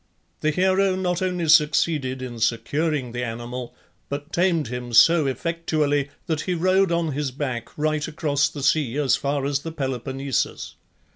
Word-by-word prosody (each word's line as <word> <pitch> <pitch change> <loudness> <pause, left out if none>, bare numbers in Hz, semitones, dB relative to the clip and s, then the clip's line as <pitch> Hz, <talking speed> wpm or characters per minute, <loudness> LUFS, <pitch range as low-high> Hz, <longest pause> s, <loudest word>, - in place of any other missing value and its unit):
The 155 - +1
hero 190 +3 +2
not 180 -1 -1
only 180 -3 -1
succeeded 150 -4 +3
in 120 -2 -6
securing 130 +4 0
the 120 +1 -3
animal, 120 +1 -6 0.3
but 145 +3 -6
tamed 170 -7 +1
him 125 -1 -5
so 160 +4 +6
effectually 150 0 -1 0.2
that 160 -2 -1
he 180 - -2
rode 185 +2 +2
on 170 -2 0
his 145 0 -2
back 130 -3 -4
right 155 0 0
across 145 -2 0
the 145 - -7
sea 140 -3 +1
as 140 -4 +3
far 140 -1 -1
as 140 0 0
the 165 +3 -6
Peloponnesus. 135 -2 -3
145 Hz, 155 wpm, -23 LUFS, 130-165 Hz, 0.3 s, so